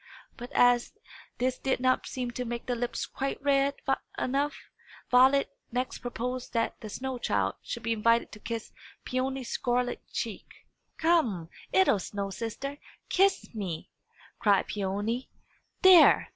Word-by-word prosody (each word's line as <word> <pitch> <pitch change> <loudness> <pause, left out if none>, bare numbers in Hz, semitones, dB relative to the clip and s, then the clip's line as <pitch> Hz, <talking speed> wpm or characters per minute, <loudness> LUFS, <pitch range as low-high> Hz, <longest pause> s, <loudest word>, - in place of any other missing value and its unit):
But, 245 +3 -9
as 245 -1 +4 0.4
this 255 +1 0
did 265 -2 0
not 255 0 +2
seem 250 -2 -3
to 250 +1 -4
make 240 0 -5
the 250 - -1
lips 240 0 -2
quite 275 0 -3
red 280 0 +2 0.4
enough, 280 +3 0 0.5
Violet 265 +3 +5 0.2
next 250 +2 -2
proposed 245 +1 -4
that 230 -1 -1
the 215 - -7
snow 255 +4 -4
child - - 0
should - - -6
be 230 - +1
invited 230 +2 +2
to 210 - -11
kiss 230 0 -5 0.3
Peony's 260 0 -2
scarlet 245 0 0
cheek. - - -4 0.5
"Come, 245 - +2 0.2
'ittle 190 +2 +4
snow 200 +1 -4
sister, 275 +7 -5 0.3
kiss 390 -6 +2
me!" 190 -7 -5 0.5
cried 200 -2 +4
Peony. 205 +5 -2 0.5
"There! 370 -4 +8
245 Hz, 135 wpm, -29 LUFS, 225-265 Hz, 0.5 s, There